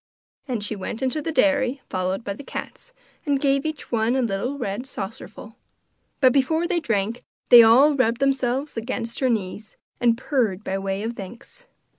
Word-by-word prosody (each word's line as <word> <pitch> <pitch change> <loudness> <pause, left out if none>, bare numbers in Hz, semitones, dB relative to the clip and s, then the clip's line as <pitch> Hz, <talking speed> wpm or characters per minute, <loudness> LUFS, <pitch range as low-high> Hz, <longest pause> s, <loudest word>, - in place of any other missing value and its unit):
And 240 -6 -3
she 215 - -3
went 215 +5 -5
into 265 +4 -1
the 325 - -3
dairy, 280 -3 +2
followed 185 +3 -2
by 200 - -4
all 200 - -6
the - - -9
cats, - - -8 0.3
and 285 -3 +1
gave 275 +1 +1
each 310 -1 -6
one 230 +1 +1
a 260 - +1
little 235 +6 -2
red 240 +1 -4
saucerful. 205 -4 -8 0.6
But 255 -3 +5
before 315 +5 +2
they 345 0 0
drank 230 -4 -2 0.3
they 240 -1 +11
all 250 +7 +6
rubbed 235 -3 +1
themselves 270 +1 0
against 230 0 -4
her 260 - +2
knees 210 -1 -3 0.2
and 235 -1 +3
purred 235 -8 -1
by 195 -1 -2
way 195 +1 -3
of 230 +1 -3
thanks. 235 - -11
245 Hz, 180 wpm, -23 LUFS, 215-275 Hz, 0.6 s, they